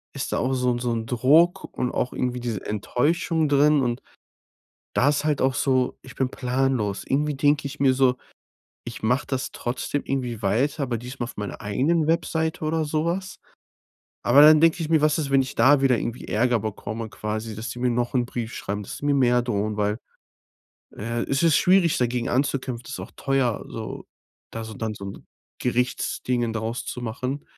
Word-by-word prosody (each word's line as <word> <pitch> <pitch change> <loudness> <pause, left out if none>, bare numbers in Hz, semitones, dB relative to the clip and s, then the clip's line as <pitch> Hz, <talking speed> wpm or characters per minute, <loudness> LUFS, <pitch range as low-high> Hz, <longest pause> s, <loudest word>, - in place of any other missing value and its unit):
ist - - -3
da - - +1
auch 130 +2 0
so 125 -1 +1
'n 120 - -1
so 120 0 -1
'n 115 -1 -2
Druck 140 +9 +3
und 125 - 0
auch 125 - -2
irgendwie 125 0 -2
diese 115 -5 -4
Enttäuschung 155 - 0
drin. 145 +1 +4
Und 120 0 -1 0.9
da 140 - +3
ist 145 0 0
halt 150 -3 +1
auch 130 0 +2
so, 130 -2 +1
ich 130 - -11
bin 130 -1 0
planlos. 125 -6 -1
Irgendwie 150 +2 0
denke 145 +1 +2
ich 140 +1 -9
mir 135 -2 +4
so: 130 -1 +3 0.7
„Ich 120 - -8
mache 125 +5 +1
das 130 -1 -3
trotzdem 125 +4 -3
irgendwie 125 -5 -2
weiter, 135 +10 +1
aber 120 -3 -2
diesmal 125 +2 -6
auf 115 - -11
meiner 105 -1 -5
eigenen 145 +11 +1
Webseite 160 -1 0
oder 155 0 0
so 155 +1 0
was.“ 185 +3 -3 0.9
Aber 130 +4 +6
dann 155 +1 +8
denke 165 +1 +4
ich 155 - -4
mir: 160 -1 +4
„Was 155 +1 +3
ist, 145 -3 -2
wenn 135 -1 +5
ich 130 - -5
da 135 +5 +5
wieder 130 -3 +4
irgendwie 120 +2 -4
Ärger 120 +2 +2
bekomme 110 +1 -5
quasi, 110 +1 -4
dass 110 +3 -5
die 120 - -7
mir 125 0 +1
noch 120 0 -1
'n 125 -2 +2
Brief 120 -1 -5
schreiben, 105 +1 -4
dass - - -7
sie - - -7
mir 145 -1 +3
mehr 125 -2 +3
drohen.“ 105 -3 -2
Weil, 105 0 0 1.0
äh, 115 +2 -2
es 135 0 0
ist 165 -3 +4
schwierig, 180 -3 +4
dagegen 120 -1 0
anzukämpfen. 130 -2 -1
Das - - -10
ist - - -5
auch - - -8
teuer 135 -5 0
so, 110 -1 -6 0.5
da 115 0 -5
so 110 - -8
dann 110 0 -3
so 100 -1 -8
'n 100 - -9 0.3
Gerichtsdingen 125 -1 -1
daraus 115 +2 -3
zu 125 - -5
machen. 125 +5 -4
125 Hz, 200 wpm, -24 LUFS, 115-145 Hz, 1.0 s, dann